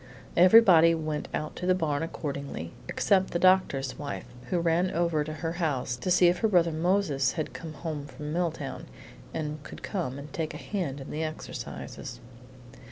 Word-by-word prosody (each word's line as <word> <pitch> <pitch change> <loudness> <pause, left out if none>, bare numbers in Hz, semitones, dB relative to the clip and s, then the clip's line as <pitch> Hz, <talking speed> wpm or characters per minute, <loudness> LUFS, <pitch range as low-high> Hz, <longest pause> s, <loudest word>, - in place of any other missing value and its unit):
Everybody 180 -3 +7
went 155 -2 -3
out 155 - -3
to 180 - -3
the 185 - +5
barn 155 -5 0
accordingly, 140 - -4 0.2
except 190 -1 +2
the - - -1
doctor's 170 -8 +3
wife, 145 - -5 0.2
who 180 - +1
ran 170 +2 +2
over 170 -3 +1
to 155 - -6
her 160 +1 -3
house 150 -8 -1
to 155 - -3
see 180 0 +6
if 175 +1 +2
her 220 - +3
brother 175 -5 +3
Moses 160 -5 +1
had 155 -3 -3
come 160 -2 -7
home 145 0 -5
from 150 +1 -6
Milltown, 165 -5 -3 0.4
and 150 -1 -4
could - - -11
come 165 -10 -3
and 140 0 -9
take 160 -2 -3
a - - -4
hand 155 -9 -3
in 135 - -8
the 155 +2 -2
exercises. 155 -5 -6
160 Hz, 175 wpm, -28 LUFS, 145-175 Hz, 0.4 s, Everybody